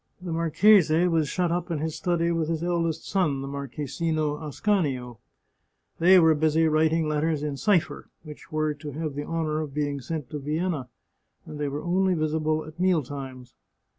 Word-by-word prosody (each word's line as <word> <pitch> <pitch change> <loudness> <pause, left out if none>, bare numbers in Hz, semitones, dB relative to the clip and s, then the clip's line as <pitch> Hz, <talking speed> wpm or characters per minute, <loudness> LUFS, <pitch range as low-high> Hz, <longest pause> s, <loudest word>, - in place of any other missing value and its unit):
The 180 -2 -6
marchese 165 +1 +4
was 160 -4 +1
shut 175 -2 0
up 175 +1 -2
in 165 - -1
his 155 +1 -3
study 170 +1 0
with 165 -2 -1
his 165 0 -2
eldest 165 -2 -1
son, 150 -9 0
the - - -5
Marchesino 150 +3 -3
Ascanio. 145 - -1 0.8
They 185 +3 +7
were 160 -2 +5
busy 155 +1 +2
writing 160 +1 +2
letters 150 0 0
in 150 -2 -2
cipher, 180 +2 0
which 150 +1 -12
were 155 -1 0
to 145 0 -8
have 155 0 -4
the 145 +1 -4
honour 160 -2 -1
of 150 -3 -7
being 145 -2 -2
sent 150 0 -5
to 150 - -4
Vienna, 150 -2 -2 0.6
and 150 - -9
they 145 - -1
were 145 +2 -4
only 185 +1 +2
visible 155 0 0
at 155 +2 -12
mealtimes. 140 -8 -2
155 Hz, 170 wpm, -26 LUFS, 145-170 Hz, 0.8 s, They